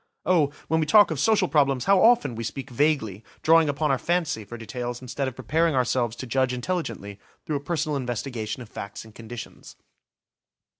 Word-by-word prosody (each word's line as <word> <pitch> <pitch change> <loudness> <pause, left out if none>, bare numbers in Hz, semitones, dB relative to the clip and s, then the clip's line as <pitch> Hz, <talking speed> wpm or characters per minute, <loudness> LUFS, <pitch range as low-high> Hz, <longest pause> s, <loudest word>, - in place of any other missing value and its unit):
Oh, 160 -5 +3 0.2
when 160 - +1
we 155 - 0
talk 205 +2 +6
of 155 - -2
social 210 -1 +3
problems, 140 -5 +2
how 195 -1 +5
often 235 - +4
we 115 0 -5
speak 135 +4 -6
vaguely, 120 -7 0 0.2
drawing 160 -1 +5
upon 145 +1 0
our 135 - +1
fancy 170 -10 -1
for 120 +4 -9
details 120 +2 -5
instead 130 +2 -3
of 130 - -5
preparing 160 +4 +1
ourselves 125 -2 +1
to 130 - -7
judge 130 +1 0
intelligently 120 - -4 0.3
through 150 - -1
a - - -4
personal 155 0 -2
investigation 125 -2 -4
of 115 - -15
facts 100 +1 -8
and 110 - -15
conditions. 115 +2 -10
135 Hz, 185 wpm, -25 LUFS, 120-160 Hz, 0.3 s, talk